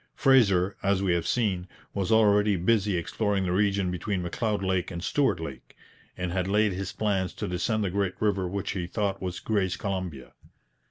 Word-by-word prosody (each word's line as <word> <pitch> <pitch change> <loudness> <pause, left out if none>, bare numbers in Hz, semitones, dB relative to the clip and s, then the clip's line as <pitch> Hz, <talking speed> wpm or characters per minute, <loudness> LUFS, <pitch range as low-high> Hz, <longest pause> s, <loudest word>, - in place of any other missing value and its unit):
Fraser, 100 -8 +4
as 100 -1 +1
we 90 -3 +2
have 85 -1 -1
seen, 95 -7 0 0.3
was 100 +1 -1
already 105 -2 +4
busy 100 +1 +2
exploring 100 +3 -1
the 90 - -1
region 100 -1 +1
between 90 +1 -2
M'Leod 105 +3 -1
Lake 95 -1 0
and 85 -1 -6
Stuart 130 - +1
Lake, 70 -6 -8 0.4
and 90 -1 -3
had 90 0 -1
laid 105 0 +2
his 95 +1 -4
plans 100 -4 -1
to 105 - -4
descend 105 +5 0
the 95 - -1
great 100 -1 -1
river 100 -3 +1
which 100 +2 -3
he 90 -3 -3
thought 100 0 -2
was 90 -1 -4
Gray's 100 -4 0
Columbia. 90 -10 -4
95 Hz, 180 wpm, -27 LUFS, 90-105 Hz, 0.4 s, Fraser